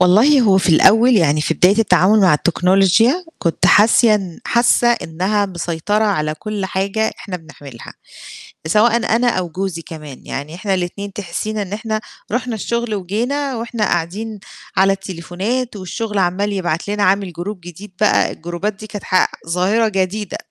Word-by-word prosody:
والله 220 +11 +5
هو 195 -5 +4
في - - -1
الأول 225 +8 +5
يعني 155 -4 +2
في 165 - -1
بداية 195 +6 +3
التعامل 205 0 +4
مع 185 -5 +5
التكنولوجيا، 195 - +2
كنت 170 +1 0
حاسة، 210 -3 +4
حاسة 240 0 +3
إنها 205 -2 0
مسيطرة 180 +4 -2
على 155 -7 0
كُلّ 210 +3 -5
حاجة 195 +4 -1
إحنا 185 -3 -6
بنعملها، 145 -7 -12 0.8
سواءً 220 +6 +3 0.2
أنا 245 +1 +1
أو 185 -6 -2
جوزي 185 -1 -4
كمان، 150 -5 -11
يعني 145 +4 -6
إحنا 190 +2 -2
الاتنين 190 +2 -4
تحسينا 210 +3 -4
إن 200 0 -5
إحنا 215 0 -3 0.3
رُحنا 240 0 -2
الشغل 235 +1 -2
وجينا، 245 +9 -2
وإحنا 230 -1 -3
قاعدين 205 +5 -2 0.4
على 195 +1 +4
التليفونات 195 +6 -4
والشغل 210 +3 -4
عَمَّال 190 +3 0
يبعت 175 -3 -2
لنا، 205 0 -1
عامل 195 -1 +1
group 205 +3 -5
جديد 175 +4 -11
بقى، - - +3
الجروبات 175 +5 -4
دي 215 +2 -11
كانت 205 -2 -8
ح 185 - +2 0.2
ظاهرة 190 +7 +1
جديدة، 195 0 -2
195 Hz, 150 wpm, -18 LUFS, 175-220 Hz, 0.8 s, والله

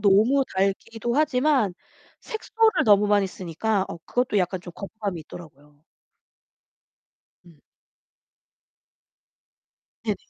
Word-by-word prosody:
너무 215 +7 +4
달기도 225 +5 -1
하지만 270 - +2 0.5
색소를 445 -1 +1
너무 205 -1 +5
많이 205 -1 +3
쓰니까 190 +3 -2
어 - - -7
그것도 245 -4 0
약간 180 0 -1
좀 175 - -10
거부감이 200 -4 -5
있더라고요. 150 -2 -14 1.6
음. 160 -4 -19 2.4
네네. - - 0
205 Hz, 215 characters per minute, -24 LUFS, 180-240 Hz, 2.4 s, 너무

